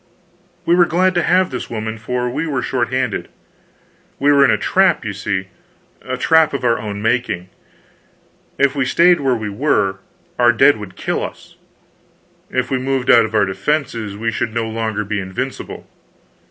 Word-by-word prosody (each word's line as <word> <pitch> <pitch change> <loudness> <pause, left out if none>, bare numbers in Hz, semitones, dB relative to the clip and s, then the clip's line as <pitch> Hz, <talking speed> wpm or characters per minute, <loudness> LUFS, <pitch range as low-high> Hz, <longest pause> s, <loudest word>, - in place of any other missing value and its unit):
We 170 - +3
were 175 0 +5
glad 185 +3 +2
to 175 - +1
have 185 +1 +2
this 125 - -5
woman, 110 -1 -4
for 125 +3 -2
we 145 +7 -2
were 130 -5 -2
short 120 -2 -1
handed. 130 -4 -1 0.9
We 145 +1 +3
were 140 -1 +5
in - - +5
a - - +3
trap, 190 -10 +2
you 105 - -3
see 95 -1 -3 0.5
a 130 0 -4
trap 160 +1 +3
of 140 - -4
our 115 -1 +2
own 105 -1 -5
making. 110 -6 -1 1.1
If 140 0 +2
we 140 - +1
stayed 170 +6 +4
where 135 -3 +1
we 110 -2 -4
were, 100 -5 0 0.4
our 120 0 +5
dead 130 +4 +5
would 100 -3 -9
kill - - -2
us; - - -9 0.9
if 130 0 -2
we 130 - +1
moved 130 0 +1
out 115 -1 +6
of 110 0 -6
our 105 - +4
defenses, 110 +1 -2
we 115 +1 -1
should 115 0 -3
no 115 -1 -1
longer 110 -1 -2
be 105 +1 -2
invincible. 95 +8 -6
125 Hz, 180 wpm, -18 LUFS, 110-140 Hz, 1.1 s, out